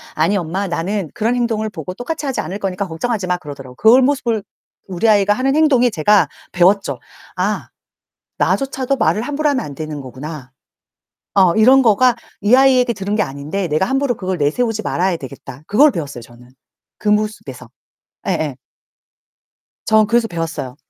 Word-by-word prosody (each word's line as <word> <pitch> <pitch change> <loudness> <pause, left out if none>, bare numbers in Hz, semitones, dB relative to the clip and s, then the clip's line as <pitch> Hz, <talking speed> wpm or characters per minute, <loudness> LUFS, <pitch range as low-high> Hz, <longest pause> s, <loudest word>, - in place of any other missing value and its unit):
"아니 165 +6 +2
엄마 185 +2 -2
나는 175 +1 -2
그런 230 +3 0
행동을 225 -3 -1
보고 175 0 -7
똑같이 290 - -5
하지 265 - -1
않을 195 - -5
거니까 195 0 -3
걱정하지마." 185 +1 -2
그러더라고요. 135 -5 -10
그런 245 +4 +5
모습을 240 -6 0 0.5
우리 185 +4 0
아이가 205 -1 +4
하는 270 +3 0
행동이 260 -6 +4
제가 205 +4 +3 0.2
배웠죠. 190 +3 +2 0.4
'아 - - -1 0.7
나조차도 270 0 0
말을 220 -3 +1
함부로 295 +4 -1
하면 260 -4 -1
안 145 - -8
되는 155 0 -6
거구나.' 135 +1 -8 0.8
어 185 -4 +4
이런 260 +5 +6
거가 240 +2 +4 0.2
'이 210 +4 +4
아이에게 260 -2 +4
들은 200 0 -3
게 210 - +2
아닌데 150 +7 -4
내가 155 +5 +1
함부로 270 -2 0
그걸 185 -2 -3
내세우지 215 +10 0
말아야 185 -2 0
되겠다.' 135 -1 -10
그걸 280 +9 +5
배웠어요 145 - -5
저는. 120 +1 -16 0.5
그 210 - -3
모습에서. 215 +1 -2 0.6
예예. - - -1 1.3
전 215 -1 +4
그래서 235 0 +1
배웠어요. 165 -7 -5
205 Hz, 370 characters per minute, -18 LUFS, 165-245 Hz, 1.3 s, 이런